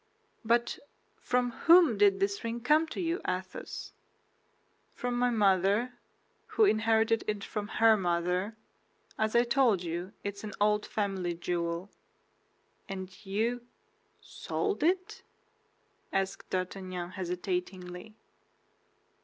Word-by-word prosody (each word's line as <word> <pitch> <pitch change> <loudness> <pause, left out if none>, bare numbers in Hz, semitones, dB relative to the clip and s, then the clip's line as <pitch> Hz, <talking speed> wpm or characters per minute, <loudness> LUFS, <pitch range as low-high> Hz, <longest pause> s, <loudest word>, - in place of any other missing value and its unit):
"But 235 +1 +1 0.4
from 250 0 0
whom 330 -1 +6
did 200 -1 +4
this 200 +1 -1
ring 230 +1 -3
come 305 +6 +3
to - - -6
you, 345 0 -1
Athos?" 185 0 -5 1.0
"From 245 0 -2
my 245 0 +2
mother, 205 +2 +2 0.6
who 440 - +7
inherited 225 - +3
it 210 -2 -2
from 210 0 -4
her 225 +1 +5
mother. 180 +3 -1 0.6
As 220 +1 0
I 235 - +6
told 235 -6 +3
you, 175 +4 -4
it 200 0 -4
is 200 - -10
an 210 -1 -6
old 210 0 +2
family 190 -4 -2
jewel." 170 +2 -3 1.0
"And 190 -1 -6
you—sold 240 - -4
it?" 365 +4 0 0.9
asked 195 0 -2
D'Artagnan, 185 -1 -4
hesitatingly. 180 +1 -4
205 Hz, 110 wpm, -30 LUFS, 185-235 Hz, 1.0 s, who